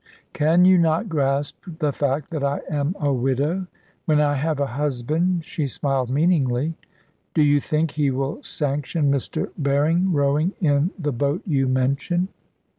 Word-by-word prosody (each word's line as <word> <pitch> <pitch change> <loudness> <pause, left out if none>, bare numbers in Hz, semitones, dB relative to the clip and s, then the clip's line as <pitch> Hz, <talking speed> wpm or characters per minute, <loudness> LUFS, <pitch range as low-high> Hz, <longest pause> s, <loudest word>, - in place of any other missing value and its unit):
"Can 165 +4 +4
you 185 -1 +6
not 165 +5 +1
grasp 140 -2 0 0.2
the 150 -4 0
fact 140 +1 -1
that 155 -4 -3
I 140 0 0
am 150 +4 -1
a 145 -2 +1
widow? 140 +9 0 0.4
When 155 -4 +3
I 145 -1 +3
have 150 +1 -1
a 140 - +2
husband," 150 +6 -1
she 150 -2 -3
smiled 135 -1 -1
meaningly, 145 -1 +1 0.6
"do 155 - +4
you 145 -1 +4
think 155 +2 0
he 150 -2 +1
will 135 - -2
sanction 145 - -1
Mr. 140 -2 -2
Berring 155 +7 +2
rowing 150 +4 +1
in 145 -1 +2
the 150 -5 -2
boat 140 +7 -1
you 140 -7 +1
mention?" 140 +8 0
145 Hz, 155 wpm, -23 LUFS, 140-165 Hz, 0.6 s, you